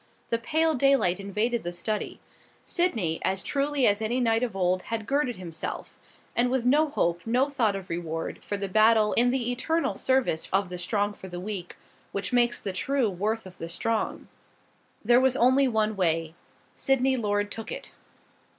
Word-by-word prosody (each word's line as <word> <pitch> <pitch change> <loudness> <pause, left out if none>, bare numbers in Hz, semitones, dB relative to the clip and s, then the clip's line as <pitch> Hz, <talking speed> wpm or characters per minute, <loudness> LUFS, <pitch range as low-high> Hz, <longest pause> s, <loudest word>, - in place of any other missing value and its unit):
The 230 - 0
pale 320 +5 +1
daylight 270 -10 +3
invaded 210 +4 -1
the 175 - -4
study. 210 +5 -3 0.5
Sydney, 225 - 0
as 190 0 0
truly 280 -1 0
as 205 +1 +3
any 230 +3 0
knight 225 -2 +2
of 240 -5 -2
old, 185 -1 +1
had 225 +1 -4
girded 275 -2 0
himself, 170 -4 -6 0.4
and 245 +1 +2
with 255 -1 0
no 295 +5 +4
hope, 170 - 0
no 255 +5 +1
thought 225 -7 +1
of 195 -1 -6
reward, 165 -1 -4
for 205 - -3
the 200 0 -3
battle 215 +2 +4
in 245 +1 +4
the 245 -1 0
eternal 320 +7 0
service 260 -11 +1
of 195 -1 +1
the 180 0 -6
strong 205 +3 0
for 190 - -11
the 175 -1 -6
weak, 185 -2 -5 0.4
which 200 +5 -3
makes 240 -1 +3
the 195 - -4
true 255 +2 0
worth 215 +4 -2
of 185 -1 -13
the 165 - -5
strong. 220 +6 -2 0.8
There 240 +3 +5
was 265 0 +2
only 260 +3 +4
one 220 -2 0
way. 165 -3 0 0.4
Sydney 270 -1 +2
Lord 205 -3 -1
took 225 - -6
it. - - -6
220 Hz, 180 wpm, -27 LUFS, 190-255 Hz, 0.8 s, There